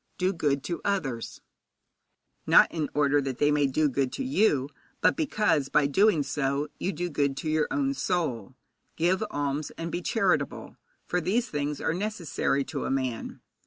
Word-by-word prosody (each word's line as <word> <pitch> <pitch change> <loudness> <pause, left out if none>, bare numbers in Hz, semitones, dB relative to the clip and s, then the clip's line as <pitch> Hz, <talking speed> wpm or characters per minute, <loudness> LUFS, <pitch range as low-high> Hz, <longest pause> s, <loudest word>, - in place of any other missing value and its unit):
Do 185 +1 +1
good 145 -5 0
to 170 - -4
others, 140 - -2 1.1
not - - +6
in 155 -3 -2
order 145 0 +3
that 135 -2 -4
they 145 +2 +3
may 145 -1 +3
do 150 +3 +2
good 135 -1 0
to - - -3
you, 205 - +2 0.3
but - - +3
because, 210 - +1
by 150 - +3
doing 165 +2 +3
so, 140 +1 -1
you 190 - -1
do 175 -2 -3
good 140 -4 0
to 155 - -3
your 155 -1 +2
own 280 -1 0
soul. 130 - -2 0.4
Give 180 +5 +1
alms, 145 -1 -2
and 165 0 -4
be 175 - -2
charitable, 225 +5 0 0.3
for 180 - -1
these 225 +9 0
things 145 -1 -2
are - - 0
necessary 180 -7 -1
to - - -5
a - - -2
man. 130 -3 -3
150 Hz, 170 wpm, -27 LUFS, 140-185 Hz, 1.1 s, not